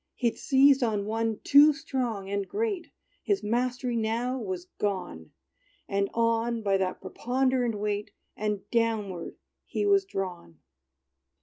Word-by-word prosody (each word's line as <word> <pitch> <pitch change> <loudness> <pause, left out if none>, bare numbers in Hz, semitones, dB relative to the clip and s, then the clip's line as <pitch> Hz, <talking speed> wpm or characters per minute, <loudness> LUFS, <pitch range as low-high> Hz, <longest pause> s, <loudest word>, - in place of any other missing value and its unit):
He'd 235 -2 0
seized 270 0 +4
on 215 -4 0
one 225 0 -1
too 295 +2 +7
strong 255 -10 -3
and 200 0 -2
great; 415 -5 -2 0.3
His 405 - 0
mastery 245 +2 -1
now 235 +3 -1
was 185 -5 -4
gone! 185 - -3 0.6
And 200 0 0
on, 230 0 +1
by 195 -1 +2
that 190 -1 -2
preponderant 250 +3 0
weight, 205 0 -2 0.3
And 210 -2 -3
downward, 220 -7 -1 0.3
he - - -2
was 400 -1 +4
drawn. 180 - -5
225 Hz, 125 wpm, -28 LUFS, 200-255 Hz, 0.6 s, too